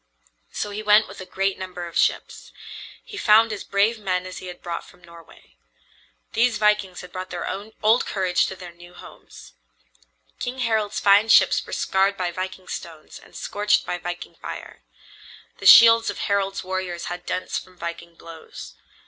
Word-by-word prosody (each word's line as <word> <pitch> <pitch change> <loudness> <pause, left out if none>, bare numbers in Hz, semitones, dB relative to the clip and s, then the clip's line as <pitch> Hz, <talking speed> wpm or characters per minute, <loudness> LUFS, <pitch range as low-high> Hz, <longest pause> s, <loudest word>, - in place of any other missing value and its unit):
So 205 - -4
he 205 +1 -5
went 210 +1 +5
with 195 0 -11
a 185 - -9
great 195 0 -1
number 185 -2 -6
of 170 - -10
ships. - - -1 0.5
He 410 - -10
found 220 - +4
as 205 - -6
brave 210 +3 +1
men 185 -3 -2
as 185 - -8
he 185 - -9
had 180 0 -9
brought 170 -1 -4
from 180 - -20
Norway. 170 - -17 0.8
These 235 +1 +2
vikings 210 -3 +1
had 180 -1 -12
brought 185 +1 -6
their 175 - -5 0.4
old 225 +3 +3
courage 185 -3 +1
to 190 - -6
their 180 -2 -10
new 175 +1 -16
homes. - - -14 0.9
King 250 +1 -4
Harald's 220 -3 0
fine 205 +2 +4
ships - - +5
were - - -10
scarred 195 +1 +1
by 180 -1 -2
viking 185 +1 -6
stones 160 -2 -8
and - - -19
scorched 210 0 0
by 180 - -3
viking 175 0 -6
fire. - - -9 0.8
The - - 0
shields 230 0 +8
of - - -5
Harald's 200 -1 -1
warriors 185 -2 -4
had 175 0 -6
dents 185 0 -2
from 185 -1 -17
viking 170 0 -7
blows. 165 -1 -11
185 Hz, 175 wpm, -23 LUFS, 175-210 Hz, 0.9 s, shields